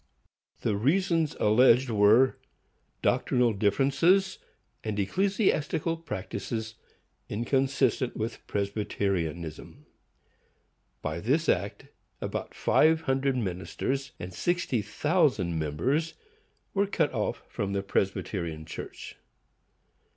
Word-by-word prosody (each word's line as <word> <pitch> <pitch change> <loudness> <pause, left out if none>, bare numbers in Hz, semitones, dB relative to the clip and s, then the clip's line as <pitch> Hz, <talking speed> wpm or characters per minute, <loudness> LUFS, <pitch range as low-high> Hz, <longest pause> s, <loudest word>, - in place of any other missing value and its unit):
The 105 - 0
reasons 165 - +1
alleged 125 +3 +5
were, 110 +5 +5 0.7
doctrinal 125 -2 +2
differences 140 - +2 0.4
and 110 -2 -3
ecclesiastical 165 - +1
practices 110 - -5 0.6
inconsistent 130 +2 0
with 115 +2 -3
Presbyterianism. 100 -6 -3 1.2
By 80 +2 -2
this 140 - +1
act 100 +3 -1 0.3
about - - -5
five 160 +1 +3
hundred 135 -2 0
ministers 125 +7 -3
and 90 +1 -7
sixty 175 - 0
thousand 105 - +1
members 125 - -1 0.6
were 200 0 +2
cut 200 - 0
off - - -2
from 100 -1 -3
the 100 0 -1
Presbyterian 90 -5 -2
Church. - - -8
120 Hz, 90 wpm, -28 LUFS, 100-150 Hz, 1.2 s, alleged